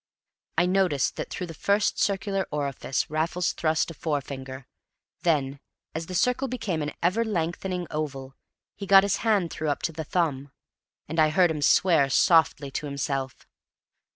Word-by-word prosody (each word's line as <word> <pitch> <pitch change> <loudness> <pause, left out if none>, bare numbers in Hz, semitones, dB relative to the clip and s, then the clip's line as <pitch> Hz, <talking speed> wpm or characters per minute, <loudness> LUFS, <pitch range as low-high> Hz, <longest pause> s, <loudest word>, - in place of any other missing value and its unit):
I 175 - +4
noticed 180 -7 +1
that - - -4
through 180 - -4
the 165 - -8
first 200 +6 +1
circular 195 -1 0
orifice 140 -3 -2
Raffles 165 +3 -1
thrust 160 +1 0
a - - -8
forefinger; 135 -3 -4 0.6
then, 140 -5 0 0.3
as 160 +1 -4
the 185 - -6
circle 250 +7 +1
became 225 -10 -3
an 150 0 -3
ever 190 +7 +2
lengthening 180 -2 -2
oval, 135 -3 -4 0.4
he 200 - -7
got 195 0 +8
his 200 -1 +1
hand 205 -7 +1
through 155 -1 -3
up 145 - -2
to - - 0
the 160 0 -5
thumb; 145 -4 -1 0.6
and 160 +2 -3
I 155 -1 +5
heard 175 +2 +3
him 150 -2 -4
swear 155 -3 +4
softly 145 -2 +3
to 150 - -4
himself. 135 -1 -3
160 Hz, 160 wpm, -26 LUFS, 145-185 Hz, 0.6 s, got